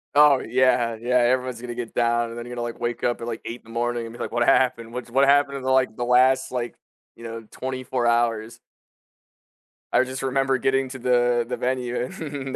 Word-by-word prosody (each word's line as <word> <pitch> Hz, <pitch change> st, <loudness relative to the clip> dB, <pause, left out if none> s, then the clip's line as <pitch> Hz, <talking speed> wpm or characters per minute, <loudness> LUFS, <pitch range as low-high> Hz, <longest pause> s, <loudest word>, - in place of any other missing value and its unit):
Oh, 145 Hz, -2 st, +7 dB
yeah, 120 Hz, -1 st, +2 dB
yeah, 125 Hz, +1 st, 0 dB
everyone's 125 Hz, 0 st, +1 dB
gonna 120 Hz, 0 st, -6 dB
get 120 Hz, -1 st, -6 dB
down, 120 Hz, 0 st, +1 dB
and 115 Hz, -, -8 dB
then 120 Hz, -, -6 dB
you're 120 Hz, -, -8 dB
gonna, 120 Hz, -, -4 dB
like, 120 Hz, -1 st, -5 dB
wake 120 Hz, 0 st, -3 dB
up 120 Hz, -, 0 dB
at, -, -, -4 dB
like, 115 Hz, -1 st, -5 dB
8 120 Hz, +1 st, -6 dB
in -, -, -41 dB
the -, -, -17 dB
morning 120 Hz, 0 st, -1 dB
and 115 Hz, -, -9 dB
be 120 Hz, -, -12 dB
like, -, -, -4 dB
what 120 Hz, 0 st, +1 dB
happened? 120 Hz, -4 st, +2 dB
What's 125 Hz, -1 st, -6 dB
what 135 Hz, +3 st, +3 dB
happened 140 Hz, 0 st, +3 dB
in 135 Hz, -, -8 dB
the, 130 Hz, -, 0 dB
like, 130 Hz, -4 st, +2 dB
the 120 Hz, -, -2 dB
last, 130 Hz, +2 st, +3 dB
like, 120 Hz, -1 st, -3 dB, 0.4 s
you 115 Hz, -, -14 dB
know, 115 Hz, -1 st, -7 dB
24 130 Hz, -1 st, -3 dB
hours? 115 Hz, -1 st, +1 dB, 1.4 s
I 130 Hz, -, +5 dB
just 130 Hz, +1 st, -6 dB
remember 135 Hz, 0 st, +1 dB
getting 135 Hz, +1 st, 0 dB
to 130 Hz, 0 st, -8 dB
the 120 Hz, -1 st, +2 dB
the -, -, -2 dB
venue 125 Hz, -1 st, -2 dB
and 140 Hz, -2 st, -6 dB
125 Hz, 225 wpm, -24 LUFS, 120-130 Hz, 1.4 s, Oh